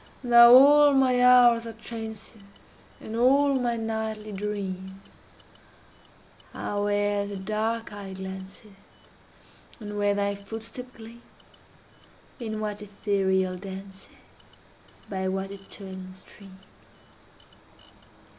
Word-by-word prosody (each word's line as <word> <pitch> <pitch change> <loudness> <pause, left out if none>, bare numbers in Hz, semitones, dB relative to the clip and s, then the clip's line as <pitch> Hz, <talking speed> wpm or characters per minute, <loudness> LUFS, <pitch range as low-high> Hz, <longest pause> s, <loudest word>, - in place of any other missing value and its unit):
Now 235 -1 +8
all 290 +2 +7
my 255 -2 +3
hours 240 -2 +6
are 225 - -7
trances; 220 -1 -8 0.6
And 220 - -8
all 275 +4 +3
my 240 -1 -1
nightly 220 -1 -4
dreams 195 -2 -5 1.6
Are 205 0 -3
where 205 0 0
the 200 -1 -6
dark 215 +3 -3
eye 200 -2 -8
glances, 190 +3 -9 1.1
And 210 -2 -6
where 205 0 +2
thy 200 0 0
footstep 225 +5 -8
gleams, 230 +1 -13 1.2
In 220 -3 -5
what 210 -1 -4
ethereal 190 -2 -1
dances, 195 0 -10 1.0
By 190 -1 -3
what 190 +1 -3
Italian 190 -1 -9
streams. 190 0 -14
210 Hz, 100 wpm, -26 LUFS, 195-230 Hz, 1.6 s, Now